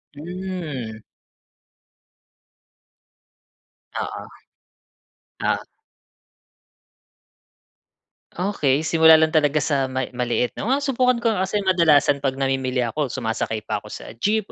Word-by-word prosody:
Hmm. 155 -9 -6 3.0
Oo, - - -4 1.2
oo. - - 0 2.7
Okey, 160 -6 0
simula 160 -1 +7
lang 160 0 +2
talaga 155 -1 +3
sa 140 -2 0
may 130 0 -3
maliit, 125 0 -1
'no? 220 - -4
Nang 270 - +3
masubukan 255 -3 +1
ko 230 -1 +1
nga 190 -2 -1
kasi 205 0 -1
kadalasan 155 -6 +4
pag 135 -1 -1
namimili 135 -1 -1
ako, 140 +3 -2
sumasakay 110 -3 -3
pa 105 -1 -2
ko 105 - -13
sa - - -9
jeep 215 0 +1
150 Hz, 105 wpm, -22 LUFS, 130-190 Hz, 3.0 s, simula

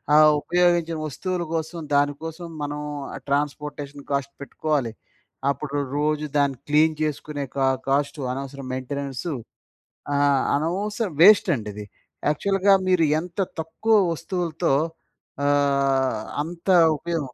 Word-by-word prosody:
ఆ - - +8 0.2
ఉపయోగించిన 175 -1 +2
వస్తువుల 180 +5 -3
కోసం 160 +1 -3 0.2
దానికోసం 160 +4 -1 0.2
మనం 145 0 -3 0.5
ట్రాన్స్‌పోర్ట్‌షన్ 145 0 -3
కాస్ట్ 140 0 -1
పెట్టుకోవాలి. 140 -3 -1 0.6
అప్పుడు 140 +1 -2 0.2
రోజు 150 +1 0
దాన్ని 140 -2 +2
క్లీన్ 155 +1 +4
జేసుకునే 150 -1 -2
క - - -2 0.3
కాస్ట్ 140 +2 +1
అనవసరం 135 0 -6
మెయింటెనెన్స్‌ 135 +3 -4 0.9
ఆ! - - +2 0.4
అనవసర 200 +8 -1
వేస్ట్ 200 0 +8
అండి 105 -2 -6
ఇది. 105 0 -7 0.4
యాక్చువల్‌గా 195 +5 +3
మీరు 180 -3 +4 0.2
ఎంత 180 +2 -9 0.2
తక్కువ 220 +8 +1 0.2
వస్తువులతో 170 -2 -1 0.7
ఆహ్, 140 -4 +2 0.2
అంత 170 +3 -9 0.3
ఉపయోగం. 160 -5 -3
150 Hz, 105 wpm, -24 LUFS, 140-170 Hz, 0.9 s, ఆ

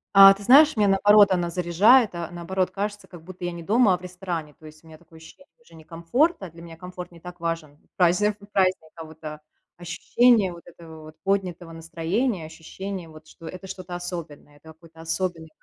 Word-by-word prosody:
А, 195 0 +10
ты 200 - -12
знаешь, 285 +4 +6
меня 210 - +3
наоборот 205 +1 +5
она 175 -2 0
заряжает, 185 +7 +3
а 170 -1 -5
наоборот 180 +2 -2
кажется, 205 -1 -5
как 175 -4 -14
будто 180 0 -9
я 175 - -3
не 170 -1 -9
дома, 210 -1 +3
а - - -6
в - - -21
ресторане. 175 -4 -6
То 155 - -13
есть 155 +1 -16
у - - -19
меня 155 -1 -14
такое 165 -1 -19
ощущение 165 +12 -16 0.2
уже 170 - -22
не 160 -1 -14
комфорта, 190 - -1
для 165 +1 -14
меня 165 -1 -12
комфорт 180 0 -9
не 170 - -15
так 180 +1 -11
важен 165 -3 -5 0.2
празни 180 +3 +3 0.2
праздника, 185 -4 +1
а 165 -1 -9
вот 160 0 -14 0.6
ощущение 210 +4 +2
вот 170 - -12
этого 160 -2 -13
поднятого 185 -4 -2
настроения, 165 +5 -3
ощущение, 180 +3 -8
вот, 155 0 -15
что 165 - -14
это 185 +1 -9
что-то 185 -2 -8
особенное, 170 -5 -8
это 145 - -21
какой-то 165 0 -17
особенный 165 -1 -4
175 Hz, 195 wpm, -24 LUFS, 165-195 Hz, 0.6 s, А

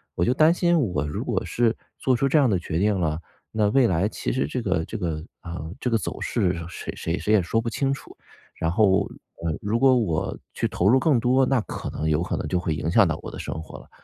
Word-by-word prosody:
我 85 - +1
就 125 - +3
担 155 +4 +5
心 175 -1 +2
我 90 - 0
如 75 - -3
果 - - -1
是 115 -1 +1 0.2
做 130 - +2
出 135 +3 +1
这 155 - +4
样 135 -4 +4
的 100 - +2
决 85 -1 -3
定 105 +1 +2
了， 80 -2 0 0.3
那 110 -1 +2
未 125 +2 +4
来 90 +1 +1
其 - - -3
实 70 - 0
这 125 - -3
个 95 -7 0
这 - - -5
个， 80 -5 -3 0.2
呃， 85 -1 -6
这 125 - -1
个 115 - +3
走 100 - -5
势 90 -2 +1 0.2
谁 - - -6
谁 80 +2 -2
谁 105 - 0
也 105 - +5
说 90 +6 0
不 115 - -4
清 135 +4 0
楚， 135 - -6 0.4
然 80 - -1
后， 100 +1 +3 0.4
呃， 80 -1 -1
如 105 +3 0
果 130 0 +6
我 90 -10 -1 0.2
去 - - 0
投 90 - 0
入 130 +5 +6
更 145 -4 +3
多， 130 +3 +3
那 135 -1 +2
可 - - -6
能 80 - -3
有 80 0 +2
可 90 - -2
能 - - -3
就 90 - +1
会 85 -3 -1
影 75 - -2
响 - - +5
到 - - -1
我 - - -6
的 - - -8
生 - - -4
活 - - -10
了。 - - -17
100 Hz, 280 characters per minute, -24 LUFS, 85-125 Hz, 0.4 s, 果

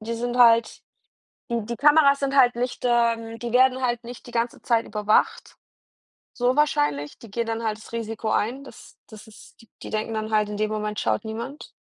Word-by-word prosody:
Die 230 +2 -4
sind 240 +1 -3
halt 230 -1 +4 0.7
die 235 -2 -1
die 235 +3 -5
Kameras 290 +1 +5
sind 275 0 -1
halt 245 -3 +5
nicht 245 +1 -4
ähm, 230 -2 +1
die 235 0 -5
werden 260 +1 +4
halt 240 -1 -1
nicht 240 +1 -10
die 240 - -11
ganze 235 0 -2
Zeit 230 -2 +1
überwacht. 210 0 0 0.8
So 245 +1 +1
wahrscheinlich, 145 - 0
die 230 - -13
gehen 230 +3 -2
dann 225 0 -3
halt 215 -1 -2
das 215 - -15
Risiko 225 -1 -4
ein, 250 +6 -1
das - - -15
das 215 0 -13
ist 220 - -17
die 225 - -21
die - - -8
denken 220 +1 -2
dann 215 0 -4
halt 215 -1 +1
in 210 - -5
dem 215 0 -1
Moment 210 -1 -3
schaut 110 -1 -1
niemand. 235 +7 -7
230 Hz, 205 wpm, -24 LUFS, 215-245 Hz, 0.8 s, Kameras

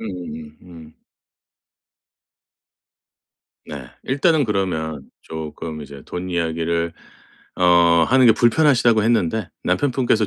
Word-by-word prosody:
음음음 85 -7 -8
음. 80 -3 -14 2.7
네. - - -8 0.2
일단은 145 +3 +2
그러면 85 - -2 0.2
쪼끔 80 0 -7
이제 70 -2 -11
돈 90 +1 -6
이야기를 85 0 -1 0.6
어 85 -2 +4
하는 130 0 +5
게 115 - +8
불편하시다고 120 -2 +3
했는데 110 -3 0 0.2
남편분께서 120 +2 +1
90 Hz, 220 characters per minute, -20 LUFS, 80-115 Hz, 2.7 s, 게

